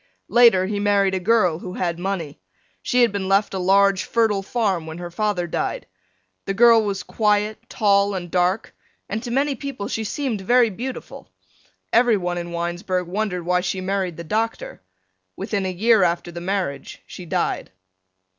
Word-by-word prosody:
Later 230 -6 +5
he 205 +1 -2
married 200 -1 +2
a 190 - 0
girl 185 -5 +2
who 180 0 -7
had 170 -2 -2
money. 175 - -4 0.4
She 250 - +2
had 235 - +3
been 200 -2 -3
left 195 +1 +2
a 190 - -2
large 195 +1 +3
fertile 220 -4 +1
farm 195 -6 -1
when 160 +1 -7
her 175 0 -7
father 205 -1 -1
died. 170 - -3 0.6
The 195 - -2
girl 230 0 +6
was 200 -2 -3
quiet, 210 0 0
tall, 200 -1 +2
and 175 -2 -6
dark, 185 +6 0 0.3
and 215 +2 -3
to 240 - -6
many 275 +4 +1
people 270 -5 -6
she 220 - -3
seemed 230 -1 -3
very 240 +3 +3
beautiful. 250 +6 -7 0.6
Everyone 200 -8 +2
in 170 0 -6
Winesburg 175 +1 -2
wondered 185 -2 -2
why 180 0 +2
she 185 +1 -2
married 185 -2 -2
the 170 - -6
doctor. 220 +6 -3 0.5
Within 195 -1 -2
a - - -2
year 220 +4 +3
after 175 0 0
the 170 0 -7
marriage 180 -7 -3
she 180 - -10
died. - - -2
195 Hz, 170 wpm, -22 LUFS, 180-220 Hz, 0.6 s, girl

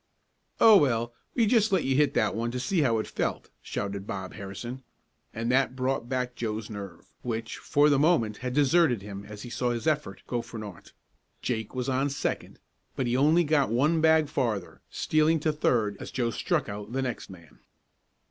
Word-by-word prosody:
"Oh, 220 -2 +9
well, 120 -6 +1 0.2
we 235 - +4
just 220 -1 +3
let 190 -4 +2
you 135 0 +1
hit 150 +1 +3
that 110 - +2
one 115 +2 -2
to 125 +1 -3
see 165 +7 +1
how 115 -5 +2
it 110 - -1
felt," - - -3
shouted 100 0 -4
Bob 95 -4 -5
Harrison, 110 +6 -7 0.5
and 115 +2 -2
that 130 0 +2
brought 130 -2 -1
back 125 -1 -1
Joe's 110 -2 -4
nerve, 100 -5 -9
which, 115 -2 -4
for 145 0 +3
the 145 -2 +4
moment, 120 -9 +2
had 125 0 -4
deserted 145 - +3
him 100 -1 -7
as 105 0 -9
he 120 - -8
saw 125 0 -1
his 115 -2 -3
effort 145 -11 -1
go 120 -1 -2
for 115 0 -10
naught. 105 -5 -9 0.5
Jake 110 -1 -3
was 125 0 -2
on 135 +2 +1
second, 135 - -3 0.4
but 130 - -1
he 120 0 0
only 155 +6 +4
got 150 -4 +2
one 150 +8 +2
bag 160 -1 +4
farther, 115 -10 -2
stealing 155 +1 +2
to 155 0 +1
third 110 -8 +1
as - - -7
Joe 120 -2 -1
struck 155 - -1
out 105 +2 -7
the 135 0 0
next 125 -2 -4
man. 85 -5 -14
125 Hz, 195 wpm, -27 LUFS, 110-145 Hz, 0.5 s, Oh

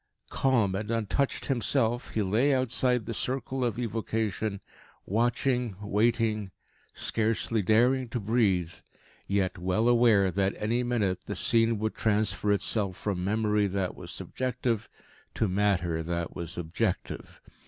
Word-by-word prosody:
Calm 120 -8 +2
and 105 +2 -3
untouched 115 +4 -1
himself, 120 -1 0
he 110 - +2
lay 120 +9 +2
outside 125 -1 +1
the 115 - -4
circle 130 +2 -2
of 120 -2 -1
evocation, 110 -3 -2 0.5
watching, 120 +1 0
waiting, 105 0 +1 0.4
scarcely 110 0 0
daring 120 +5 +3
to 120 - -2
breathe, 100 -6 +1 0.5
yet 95 -2 0
well 95 +6 +1
aware 115 -6 +4
that 95 +2 0
any 115 +3 0
minute 110 -7 -1
the - - -3
scene 115 -1 +3
would 110 +1 -2
transfer 105 -1 +1
itself 100 -2 0
from 95 -4 -2
memory 105 +1 +1
that 95 -1 -2
was - - -9
subjective 125 -4 -2 0.5
to 110 - +1
matter 90 -4 +1
that 85 0 -3
was 85 -1 -5
objective. 85 -1 -3
110 Hz, 130 wpm, -28 LUFS, 100-120 Hz, 0.5 s, aware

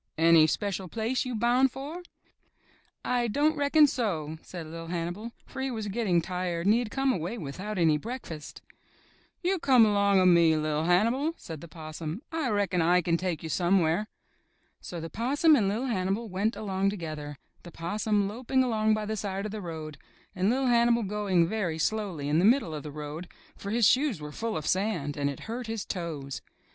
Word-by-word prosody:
''Any 165 -1 +6
special 195 0 -2
place 230 +7 -1
you 250 -2 -3
boun' 240 +4 +3
for?" 285 +7 -7 1.0
''I 245 -1 +1
don't 295 +6 +2
reckon 290 +1 +5
so," 165 - -2
said 175 -3 -8
Li'l' 165 +1 -8
Hannibal, 175 +6 -4
for 265 - -7
he 265 - -1
was 220 -4 -4
getting 195 -6 +1
tired 180 -1 -3
and 205 - +5
he 235 - +3
had 240 -3 -3
come 270 +2 +1
away 180 +4 -3
without 190 +6 -5
any 160 -3 +3
break 245 - -6
fast. 155 -3 -9 0.8
''You 370 +1 +1
come 255 -6 +6
along 200 -2 +3
of 185 - +5
me, 170 -3 +5
Li'l' 155 0 -1
Hannibal," 230 - +2
said 160 -3 -8
the 170 - -9
Possum; 160 - -7
"I 320 -5 -1
reckon 200 -4 +1
I 175 +2 +3
kin 170 0 +2
take 175 -2 -2
you 160 - -5
somewhere." 175 +3 +2 0.7
So 175 - -6
the 165 0 -7
Possum 285 - +3
and 205 -7 +2
Li'l' 225 +6 -1
Hannibal 205 -1 -1
went 200 +5 0
along 195 -2 0
to 205 - -4
gether, 150 -4 -6 0.2
the 175 - -11
Possum 205 +5 -1
loping 255 +5 0
along 220 -3 +2
by 215 0 -3
the 220 +1 -2
side 195 -1 -3
of 215 - -4
the 215 0 -5
road, 155 -4 -7 0.4
and 190 +2 +1
Li'l' 260 +3 +1
Hannibal 235 -1 +4
going 195 -4 +1
very 185 -5 -2
slowly 185 -5 -1
in 150 +2 +2
the - - +2
middle 225 - +3
of 150 - -4
the 150 - -7
road, 150 +4 -6 0.3
for 200 - -7
his 230 +1 +3
shoes 265 - +2
were 150 0 -7
full 225 +5 -3
of 155 - -5
sand 185 -7 0
and 140 -1 0
it 140 - -7
hurt 235 +2 -5
his 225 -3 -4
toes. 155 -7 -5
195 Hz, 195 wpm, -28 LUFS, 165-230 Hz, 1.0 s, Any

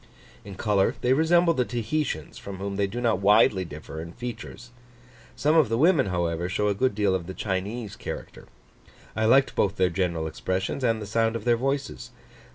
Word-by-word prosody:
In 100 -1 -9
colour 100 -1 +1
they 125 - +3
resemble 170 +3 +4
the 130 - +1
Tahitians, 120 - -3
from 100 -1 -8
whom 100 +1 -4
they 100 0 +1
do 115 +5 -5
not 115 -4 +1
widely 100 -1 +4
differ 80 -1 -8
in 85 +1 -9
features. 120 0 -8 0.6
Some 150 +2 +2
of 155 -8 +4
the 115 - 0
women, 155 - +4
however, 85 -1 -1
show 105 +3 0
a - - +2
good 125 +1 0
deal 100 -2 +2
of 90 -2 -2
the 95 - -7
Chinese 100 +3 -3
character. - - -8 0.7
I 110 - 0
liked 135 +4 +4
both 100 0 +1
their 90 -3 +2
general 85 -3 -1
expressions 95 - -3
and 115 -2 +2
the 105 - -6
sound 115 +2 0
of 115 - -5
their 120 -1 +4
voices. 135 +3 -3
105 Hz, 190 wpm, -26 LUFS, 95-125 Hz, 0.7 s, resemble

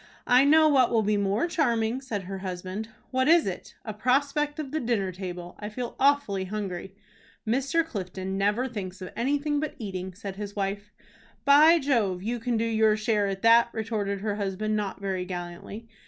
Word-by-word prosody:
"I 250 +2 +5
know 310 +2 +6
what 265 -5 +4
will 225 -2 +3
be 210 +1 +1
more 200 +5 +1
charming," 245 -7 0
said 220 -7 -4
her 190 +1 -6
husband. 185 +3 -5 0.2
"What 260 +1 +1
is 335 0 +6
it?" 185 -2 -6
"A 215 - -4
prospect 280 +6 +1
of 295 -4 -5
the 315 - -1
dinner 230 -7 0
table. 180 -1 -7
I 210 - -5
feel 240 +2 -5
awfully 275 -9 +2
hungry." 195 -2 -5 0.5
"Mr. 270 +8 +1
Clifton 190 - -5
never 205 +6 +1
thinks 195 -6 -6
of 185 - -7
anything 290 +4 0
but 305 0 -3
eating," 190 -5 -5
said 195 -1 -7
his 205 -1 -6
wife. 200 +1 -3 0.5
"By 300 +4 +7
Jove! 225 - 0
you 235 +3 -2
can 240 0 -1
do 225 - 0
your 220 -1 +3
share 215 -1 +1
at 195 +1 -4
that," 230 +1 +6
retorted 210 -3 -2
her 205 -1 -2
husband 210 +2 -2
not 205 -2 -3
very 190 -2 -2
gallantly. 180 +5 -7
215 Hz, 185 wpm, -27 LUFS, 195-260 Hz, 0.5 s, By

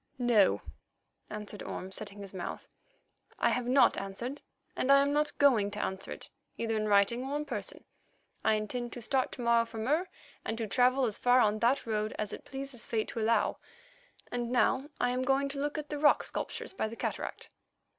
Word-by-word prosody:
"No," 240 -6 +4 0.7
answered 210 -1 -6
Orme, 185 +1 -6
setting 205 0 -4
his 195 -1 -8
mouth. 180 -2 -5 0.7
"I - - +3
have 250 -1 -1
not 260 +2 +5
answered, 215 +8 -5 0.3
and 265 - +2
I 275 - +8
am 280 +1 +2
not 300 0 0
going 235 -8 +4
to 205 0 -6
answer 190 0 -4
it, - - -7 0.3
either 225 -1 -1
in 215 0 0
writing 205 +4 +3
or 275 +2 -2
in 300 - -3
person. - - -5 0.6
I 220 - +4
intend 235 +3 -3
to 245 - -7
start 260 +2 +1
to - - -6
morrow 235 -1 +4
for 230 0 -9
Mur 300 +11 0 0.3
and 225 - -3
to 230 - -2
travel 250 +5 +3
as 215 -4 -2
far 245 +1 +5
on 215 -2 +3
that 245 +5 +2
road 215 -1 -1
as 210 -1 -2
it - - -8
pleases 270 -3 -6
fate 220 -2 -1
to 230 - -4
allow, 220 -1 +2 0.7
and 240 -1 -2
now 260 +3 +2
I 245 - +2
am 250 +1 -1
going 270 +2 +2
to 275 0 -4
look 290 +2 -1
at 300 -1 -5
the 295 - -3
rock 295 - +5
sculptures - - -4
by 220 - -1
the 225 - -7
cataract." - - -4
240 Hz, 200 wpm, -31 LUFS, 215-270 Hz, 0.7 s, I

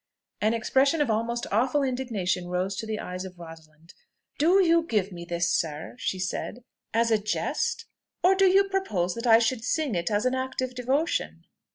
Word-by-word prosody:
An 215 +2 +2
expression 270 +7 +2
of 285 -6 +2
almost 235 +2 -1
awful 255 +7 +2
indignation 230 -9 -2
rose 180 +2 -2
to 220 - -4
the 220 -1 -3
eyes 180 0 -5
of 185 -1 -9
Rosalind. 165 -1 -13 0.5
"Do 345 +6 +5
you 335 -3 +4
give 210 - -1
me 170 -1 -8
this, 170 0 0
sir," 155 -2 -2
she 190 - -2
said, 190 +6 -4 0.3
"as 230 0 +2
a 220 - +4
jest? 460 - -2 0.4
or 370 +2 +6
do 385 0 +3
you 385 +2 +5
propose 380 - -1
that 230 +1 -4
I 225 -1 +8
should 230 0 0
sing 305 -1 0
it 170 -1 -1
as 210 +2 0
an 255 - +2
act 260 0 -3
of 255 -1 -1
devotion?" 265 +6 -1
230 Hz, 190 wpm, -26 LUFS, 185-265 Hz, 0.5 s, I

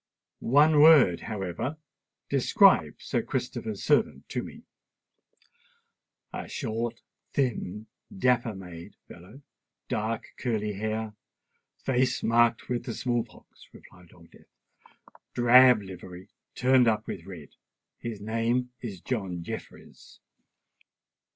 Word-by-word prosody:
One 145 +4 +4
word, 150 - +7
however;—describe 110 - 0
Sir - - -2
Christopher's - - -4
servant - - +1
to - - -2
me." - - -11 1.7
"A - - -5
short—thin—dapper 115 -1 -3
made 90 -3 -10
fellow—dark 110 +2 -7
curly 105 -4 -1
hair—face 110 +4 -4
marked 115 0 +2
with 125 -1 -3
the 120 - -4
small 120 -2 0
pox," 115 - -19
replied 90 -2 -17
Old 85 -2 -19
Death. - - -20 0.9
"Drab 125 -2 +6
livery, 90 -1 -10 0.3
turned 125 -1 +4
up 110 0 +1
with 85 - -7
red. 85 -7 -10 0.5
His 115 -3 -6
name 115 +4 -1
is 100 -8 -7
John 95 -8 -3
Jeffreys." - - -10
115 Hz, 95 wpm, -27 LUFS, 95-125 Hz, 1.7 s, word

